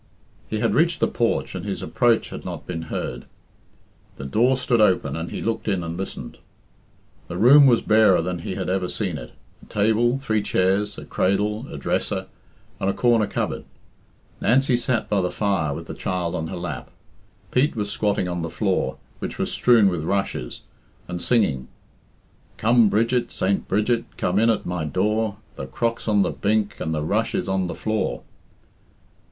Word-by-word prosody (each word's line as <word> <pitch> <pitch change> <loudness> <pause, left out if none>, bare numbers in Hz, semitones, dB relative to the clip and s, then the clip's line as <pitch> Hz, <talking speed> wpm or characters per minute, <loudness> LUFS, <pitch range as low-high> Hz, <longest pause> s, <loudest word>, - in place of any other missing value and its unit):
He - - -2
bad - - +1
reached - - +2
the - - +3
porch - - 0
and 90 - -5
his 100 -1 -4
approach 120 -2 +2
had - - -8
not - - -6
been 85 -2 -4
heard. 60 0 -4 0.9
The 70 - -7
door 120 - +2
stood 120 -3 +2
open 90 -9 +2
and 80 +1 -4
he - - -5
looked 115 0 -2
in 95 -4 0
and 85 0 -4
listened. 95 +2 -6 0.9
The 85 - -5
room 135 +7 +8
was 120 -3 +4
barer 105 -5 +5
than 90 0 -3
he 90 - -5
had 95 -1 -3
ever 90 -1 0
seen 90 -8 -3
it - - -10 0.3
a - - -15
table, 110 +4 +2
three 110 -6 0
chairs, 100 +1 +1
a - - -8
cradle, 105 +5 0
a - - -7
dresser, 70 - -1 0.5
and 95 - 0
a - - +1
corner 115 -4 +3
cupboard. - - -3 0.8
Nancy 130 +2 +3
sat 120 -1 0
by 100 -2 +1
the 90 - 0
fire 95 -8 0
with 70 - -5
the - - -7
child 90 -2 -2
on 80 - -2
her 95 - -5
lap. 90 0 -5 0.6
Pete 140 +4 +2
was 105 -2 -2
squatting 100 -4 0
on 90 -1 -3
the 85 - -3
floor, - - -1 0.2
which - - -5
was - - -1
strewn 115 -5 +5
with 90 -5 -1
rushes, 95 -9 -2 0.5
and 90 0 -4
singing 90 - +1 0.9
"Come, 115 0 +4
Bridget, 120 +3 +1
Saint 95 +1 0
Bridget, 110 +4 +1
come 90 +3 +1
in 115 +1 +4
at 110 - +1
my 90 -2 -2
door, 105 +6 0 0.2
The 65 - -5
crock's 115 - -2
on 105 -2 +4
the - - -1
bink, 105 0 0
and 80 - -2
the 75 -1 -1
rush 105 +8 0
is - - -1
on 95 -1 0
the - - -5
floor." 110 0 -2
100 Hz, 180 wpm, -23 LUFS, 90-115 Hz, 0.9 s, room